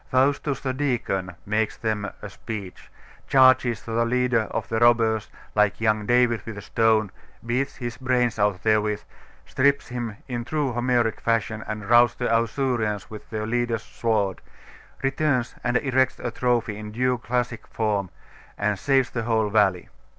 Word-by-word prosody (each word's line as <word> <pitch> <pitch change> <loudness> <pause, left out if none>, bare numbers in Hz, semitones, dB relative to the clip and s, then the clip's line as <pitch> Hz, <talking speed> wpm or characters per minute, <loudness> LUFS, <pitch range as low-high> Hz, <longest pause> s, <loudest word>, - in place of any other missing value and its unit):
Faustus, 135 +1 +1
the 130 -2 -2
deacon, 115 -9 -2
makes 110 +1 0
them 105 -2 -2
a - - -4
speech; 105 -3 -8 0.4
charges 130 -4 +4
the 115 0 0
leader 125 -2 +1
of - - -3
the 115 - -1
robbers, 115 -2 +3 0.2
like 105 -1 +2
young 110 -2 +1
David, 120 -3 +3
with 110 -2 -7
a - - -6
stone, 110 -2 +2 0.3
beats 125 +4 -1
his 120 -3 -5
brains 125 -4 0
out 100 -3 +1
therewith, 105 -1 +1 0.4
strips 140 +1 +1
him 120 -4 -4
in 120 -2 -3
true 145 0 -1
Homeric 120 -2 +1
fashion, 110 -1 0
and 105 -1 -5
routs 120 +1 +5
the 125 - -3
Ausurians 115 -3 0
with 105 -1 -10
their 110 -1 -3
leader's 120 0 -1
sword; 105 -5 -1 0.6
returns 135 -3 0
and 125 0 +2
erects 130 -1 +1
a 120 - -4
trophy 120 -3 0
in 105 0 -7
due 125 +2 0
classic 120 0 -2
form, 105 -4 -1 0.5
and 100 -1 0
saves 135 -2 +2
the 120 - -2
whole 110 -2 +1
valley. 95 -4 +2
115 Hz, 155 wpm, -24 LUFS, 110-125 Hz, 0.6 s, routs